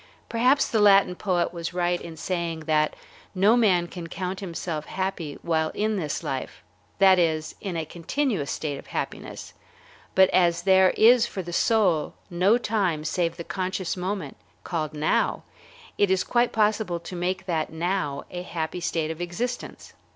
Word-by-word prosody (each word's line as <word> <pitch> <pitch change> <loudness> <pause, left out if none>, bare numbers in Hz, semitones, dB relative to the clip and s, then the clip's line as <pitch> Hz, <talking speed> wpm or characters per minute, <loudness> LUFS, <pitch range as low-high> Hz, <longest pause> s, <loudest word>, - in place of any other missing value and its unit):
Perhaps 255 +4 +3
the 225 - 0
Latin 200 -3 +6
poet 180 -2 -1
was 170 0 -5
right 175 0 0
in 165 -1 -9
saying 170 -2 -3
that 155 -1 +1 0.4
no 200 +5 +5
man 190 -8 +3
can 175 -1 -8
count 185 +2 -4
himself 165 -4 -4
happy 185 -6 -3
while 160 -2 +1
in 215 +1 0
this 160 -7 -3
life, 135 -1 -5 0.3
that 190 -1 +6
is, 160 -2 0
in 185 -4 -3
a 160 - -2
continuous 175 - -2
state 145 -3 -3
of - - -13
happiness; - - -5 0.6
but 190 0 +7
as 170 -2 +3
there 190 -1 +6
is 235 +1 +6
for 190 - -5
the 175 0 -7
soul 185 -6 +2 0.2
no 185 +6 +4
time 195 -10 0
save 165 +1 -1
the 170 - -5
conscious 185 0 -3
moment 185 -5 -4 0.3
called 155 -3 -3
"now," 150 +1 +1 0.6
it 205 - +4
is 190 -1 +2
quite 240 0 +1
possible 210 -5 +1
to 170 +2 -8
make 180 +2 -2
that 160 -4 -1
"now" 160 -4 -2
a 180 - -4
happy 170 0 -4
state 165 -2 -1
of 160 +1 -7
existence. 235 +9 -5
180 Hz, 165 wpm, -25 LUFS, 165-195 Hz, 0.6 s, but